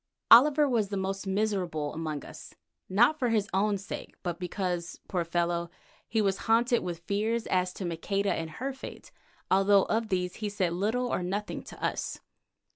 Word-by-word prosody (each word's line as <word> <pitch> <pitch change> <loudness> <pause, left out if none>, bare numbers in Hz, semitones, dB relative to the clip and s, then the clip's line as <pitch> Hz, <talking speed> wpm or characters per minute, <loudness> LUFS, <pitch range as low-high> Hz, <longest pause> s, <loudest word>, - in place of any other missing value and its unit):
Oliver 290 +5 +8
was 225 -6 +1
the 200 - -2
most 195 +1 -3
miserable 190 -7 -1
among 155 -3 -4
us, - - -11 0.3
not 240 +11 +4
for 245 - +1
his 215 -3 +1
own 200 +1 +2
sake, 195 - -7
but 175 -2 -3
because, 180 -1 -3
poor 180 -3 0
fellow, 170 0 -1 0.4
he 220 -1 +1
was 195 -1 +1
haunted 235 +2 +4
with 170 -1 -5
fears 220 +4 0
as 180 0 +1
to 190 - -5
Maqueda 195 +4 -1
and 165 0 -3
her 265 +11 -4
fate, 265 - -10 0.4
although 195 +1 +5
of 225 0 0
these 180 -2 -1
he 210 -1 -2
said 190 -4 0
little 220 +8 0
or - - 0
nothing 200 +4 -3
to - - -12
us. - - -2
195 Hz, 175 wpm, -29 LUFS, 180-220 Hz, 0.4 s, Oliver